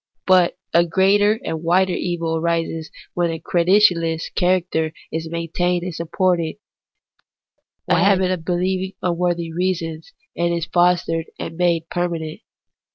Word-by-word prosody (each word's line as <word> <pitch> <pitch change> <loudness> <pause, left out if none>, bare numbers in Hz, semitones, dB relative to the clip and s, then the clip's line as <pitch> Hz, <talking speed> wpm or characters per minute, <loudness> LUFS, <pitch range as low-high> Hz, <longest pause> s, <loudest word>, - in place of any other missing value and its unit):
But 185 -2 +4 0.2
a 170 - +6
greater 200 +5 +3
and 160 -1 -3
wider 180 +2 +2
evil 170 -2 -2
arises 165 -1 -1 0.2
when 175 -1 0
the 165 - -3
credulous 170 -2 +2
character 175 -4 0 0.2
is 160 0 -4
maintained 175 +1 -1
and 180 -1 -4
supported, 170 0 0 1.3
when - - +2
a - - +3
habit 190 -2 +3
of 180 -3 -3
believing 185 +2 -1
for 180 - -1
unworthy 170 -1 -1
reasons 165 -3 -2 0.2
is 170 -1 0
fostered 175 -1 +1
and 165 - -6
made 170 -2 +1
permanent. 170 -3 -3
175 Hz, 130 wpm, -21 LUFS, 165-180 Hz, 1.3 s, a